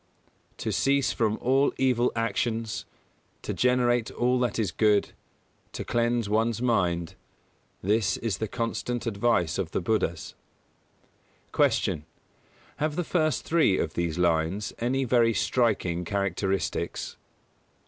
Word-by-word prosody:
_ - - -40
"To - - -3
cease 140 -1 +2
from 110 -2 0
all 135 +3 +3
evil 125 -2 +2
actions, 115 0 -1 0.6
To - - -3
generate 120 -2 +2
all 125 +1 +1
that 125 -3 0
is 105 -6 0
good, 105 +3 +2 0.6
To - - -5
cleanse 120 -1 +1
one's 115 +2 +1
mind: 90 -9 0 0.7
This 105 +2 +1
is 110 -5 -2
the 110 - -1
constant 120 +2 -3
advice 100 -6 +1
of 90 -4 -2
the - - +1
Buddhas." 90 -3 -1 1.2
147. - - +2
Q. 75 - -20 0.8
_Have 155 -1 0
the 180 - 0
first 155 -4 0
three 155 - +3
of 80 - -2
these 85 -1 -2
lines 85 +3 0
any 130 +3 0
very 115 -2 +3
striking 95 -5 +1
characteristics? 95 +1 -2
115 Hz, 130 wpm, -27 LUFS, 95-120 Hz, 1.2 s, all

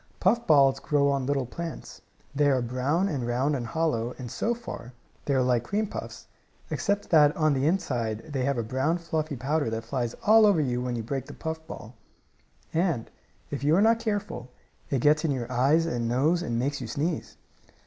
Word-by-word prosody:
Puff 230 +5 +2
balls 135 -3 +5
grow 140 -1 +2
on 135 -2 -1
little 140 -2 0
plants. 170 +6 -7 0.3
They 145 0 +3
are 130 -3 +2
brown 130 +10 0
and 135 -10 -2
round 130 +5 +1
and 120 -3 -3
hollow, 125 -5 -1
and, 125 -3 -7
so 230 - -1
far, 180 - -8 0.3
they 140 - +1
are 130 - +3
like 125 -2 +2
cream 205 - -1
puffs, - - -7 0.5
except 200 0 -1
that 150 -2 +6
inside 135 - 0
they 130 -2 0
have 140 0 0
a 115 - 0
brown, 130 +9 0
fluffy 160 -3 -3
powder 140 +1 0
that 115 0 -3
flies 120 0 -3
all 220 0 +7
over 200 -6 +4
when 125 -1 -2
you 115 - -3
break 135 +3 -4
the - - -9
puff 160 0 -5
ball. 115 -7 -9 0.8
And, 165 -8 0 0.4
if 140 -1 -4
you 150 +3 +4
are 195 - +4
not 225 +1 +4
careful, 205 - -3 0.4
it 135 -4 0
gets 150 +2 +4
in 160 - +1
your 125 -3 -2
eyes 140 +7 +3
and 120 -8 -2
nose 145 +9 +2
and 120 -9 -2
makes 135 +3 -1
you 120 - -5
sneeze. 155 +6 -3
140 Hz, 190 wpm, -27 LUFS, 125-165 Hz, 0.8 s, all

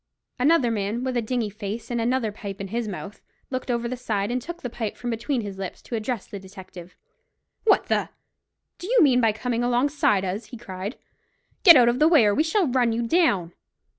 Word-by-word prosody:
Another 270 -2 +3
man, 215 +3 -2
with 260 -1 -2
a 240 - +1
dingy 225 -2 -2
face, 210 +3 -6
and 235 -1 0
another 240 -1 0
pipe 200 -2 -8
in 195 -1 -5
his 230 +2 -2
mouth, 200 0 -7 0.3
looked 255 0 -4
over 235 -1 0
the 255 - -3
side, 220 -4 -2
and 250 +1 -1
took 345 +6 -7
his 245 - -6
pipe 225 -4 -4
from 245 -1 -4
between 235 +3 -2
his 200 -2 -7
lips, 190 -2 -6
to 235 - -5
address 225 -1 -3
the 200 - -8
detective. 185 -2 -12 0.7
"What 425 - +4
the - - 0 0.3
—— - - -58
do 355 - -7
you 475 -3 +5
mean 255 -4 +4
by 225 -2 +4
coming 235 +2 -2
alongside 245 -5 +2
us?" 195 +5 -3
he 240 - -10
cried. 195 0 -6 0.6
"Get 340 -5 +10
out 245 -3 +6
of 240 +2 +2
the 310 - +5
way, 310 -9 +6
or 205 - +3
we 300 - +2
shall 350 +5 +1
run 245 -3 +2
you 235 +1 -1
down." 215 - +2
235 Hz, 220 wpm, -24 LUFS, 205-255 Hz, 0.7 s, Get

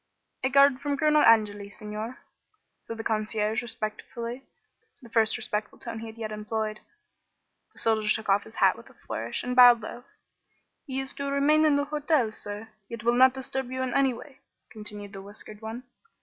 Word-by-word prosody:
"A 260 - +2
guard 275 -1 +5
from 285 -1 -1
Colonel 305 0 +4
Angeli, 205 -4 +4
Signor," 215 +4 -6 0.6
said 230 - -8
the 225 - -5
concierge, 215 0 0
respectfully 235 +1 -5 0.6
the 235 -4 -15
first 225 -1 +3
respectful 210 0 -3
tone 230 -2 -6
he 225 - -7
had 220 0 -11
yet 220 -1 -5
employed. 215 0 -3 0.9
The - - -18
soldier 220 -1 +1
took 220 +1 +1
off 200 0 +3
his 220 - -13
hat - - +4
with - - -14
a - - -20
flourish, - - -4
and 250 0 -2
bowed 245 -2 +8
low. 240 +3 -8 0.8
"He 265 -1 -3
is 270 0 -5
to 280 0 -4
remain 295 +3 +4
in 300 -2 +4
the 285 0 +1
hotel, 295 -5 +1
sir, 210 +1 -7 0.2
yet 230 -2 -7
will 235 +1 +3
not 260 +1 +6
disturb 265 -1 -4
you 260 0 -2
in 255 -2 -2
any 275 -1 +3
way," 260 +3 -11 0.3
continued 210 -2 -7
the 195 - -7
whiskered 205 +1 -10
one. 225 +3 -6
230 Hz, 185 wpm, -27 LUFS, 215-265 Hz, 0.9 s, bowed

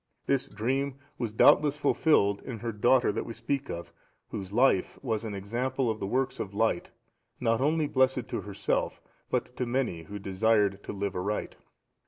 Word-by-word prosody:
This 135 -2 +1
dream 130 +6 -1 0.2
was 120 -3 -2
doubtless 145 +6 +5
fulfilled 100 -10 +3
in 125 -4 -6
her 115 +2 -3
daughter 120 +3 +3
that 105 - -2
we 115 - -7
speak 140 +3 -2
of, 85 0 -6 0.4
whose 95 -1 -6
life 120 -4 +3
was 115 -4 -1
an 110 -3 -4
example 120 +5 -1
of 110 - -5
the 95 - -3
works 130 +5 0
of 100 0 -5
light, 110 -4 +1 0.5
not 115 +1 +1
only 155 +2 +2
blessed 130 -3 +2
to - - -2
herself, 100 -1 -2 0.3
but 125 - -2
to 125 - -1
many 120 -9 -1
who 105 +5 -7
desired 100 0 +2
to - - -4
live 100 -1 -3
aright. 100 +4 -2
115 Hz, 175 wpm, -29 LUFS, 100-130 Hz, 0.5 s, doubtless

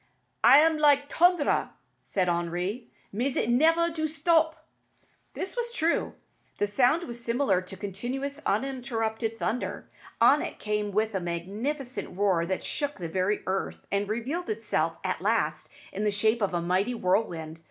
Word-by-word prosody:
"It - - +6 0.2
am 320 -1 +2
like 285 -1 +4
t'ondre," 350 -3 +3 0.3
said 185 -2 -1
Henri; 175 +6 -2 0.3
"mais 250 +6 -1
it 235 - +1
nevair 330 +6 +3
do 315 -1 -1
stop." 320 0 +1 0.7
This 380 - -4
was 475 -1 -2
true. 330 -5 0 0.4
The - - +1
sound 250 +10 +2
was 235 -1 -7
similar 235 -6 +1
to 185 +1 -9
continuous, 255 +9 -4
uninterrupted 225 -2 -1
thunder. 235 +2 -3 0.3
On - - +6
it - - -5
came 210 -1 -2
with 215 +2 0
a 190 - 0
magnificent 200 - -4
roar 185 -4 +2
that 190 0 -2
shook 290 -1 -2
the 170 -4 -5
very 185 +4 0
earth, 190 +1 -3
and 200 0 0
revealed 260 +11 -3
itself 205 -7 -1
at 185 -1 -2
last 185 -7 0 0.2
in 200 - -3
the 210 - +3
shape 220 +3 +1
of 195 -3 0
a 170 - 0
mighty 190 +7 +1
whirlwind. 175 -6 -1
220 Hz, 155 wpm, -27 LUFS, 190-280 Hz, 0.7 s, It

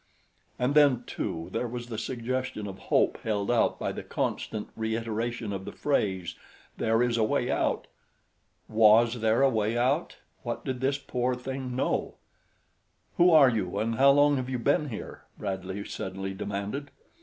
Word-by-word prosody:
And 125 +3 +1
then, 145 -5 +5
too, 80 0 -4
there 125 - -1
was 120 0 -5
the 115 -3 -5
suggestion 130 -2 -3
of 95 -1 -7
hope - - +3
held 105 -1 -1
out 120 - +2
by - - -2
the - - -6
constant 105 -1 -3
reiteration 115 0 -2
of 95 -1 -4
the - - -7
phrase, 95 - -1 0.4
"There 115 +2 +2
is 120 -1 +1
a 110 - +3
way 110 - +1
out." - - 0 0.8
Was 115 +2 +5
there 110 +4 +3
a 135 - +6
way 110 0 0
out? 135 +7 +1 0.3
What 120 -2 -5
did 130 -2 -3
this 135 +1 +1
poor 125 -2 -1
thing 130 0 -5
know? 130 - -1 1.0
"Who 175 +1 +6
are 155 -6 +7
you 105 -6 -2
and 115 +1 -1
how 135 +1 +6
long 145 +1 +5
have 130 0 -3
you 130 - -1
been 145 +5 +1
here?" 110 - -8
Bradley 95 0 -4
suddenly 95 +1 -5
demanded. 105 +8 -4
120 Hz, 165 wpm, -28 LUFS, 105-130 Hz, 1.0 s, are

